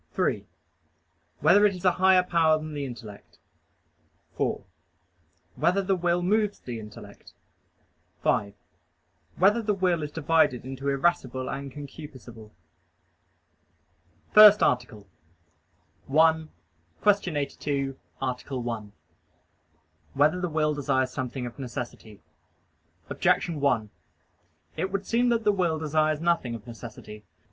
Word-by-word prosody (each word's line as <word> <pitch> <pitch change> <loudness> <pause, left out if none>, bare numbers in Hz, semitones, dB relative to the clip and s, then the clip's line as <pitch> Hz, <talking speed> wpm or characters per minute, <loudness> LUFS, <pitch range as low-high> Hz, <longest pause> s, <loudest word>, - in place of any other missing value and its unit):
(3) - - -1 0.9
Whether 205 +2 +5
it 205 -2 +3
is 180 +1 -9
a 180 - +6
higher 190 -1 +6
power 165 -3 +3
than 155 0 -7
the 145 -1 -3
intellect? 115 -5 -11 1.0
(4) - - -2 0.9
Whether 195 +3 +1
the 190 0 +1
will 175 0 0
moves 210 +2 +1
the 120 -2 -7
intellect? 105 -1 -12 0.9
(5) 100 -1 0 0.8
Whether 205 +6 +3
the 210 -2 0
will 180 -3 +1
is 150 - -4
divided 155 -5 +1
into 135 +1 -4
irascible 135 -3 0
and 140 0 -5
concupiscible? 130 -6 -11
_______________________ - - -32 1.8
FIRST 210 -1 +9
ARTICLE 120 -5 -1 1.0
[I, 160 +2 +3
Q. 195 0 -2
82, 140 -1 -3 0.2
Art. 130 -2 -3
1] 115 -5 -4 1.2
Whether 155 +6 +3
the 180 - -1
Will 155 -1 +1
Desires 130 -3 0
Something 130 0 -4
of 120 +3 -9
Necessity? 120 -6 -7 0.9
Objection 165 -4 +1
1: 120 -7 +1 0.9
It 185 +4 -2
would 195 0 -3
seem 240 +3 +2
that 230 -1 +1
the 210 - +4
will 175 -5 0
desires 155 0 0
nothing 170 -8 0
of 110 - -10
necessity. 115 -3 -10
150 Hz, 120 wpm, -26 LUFS, 125-180 Hz, 1.8 s, FIRST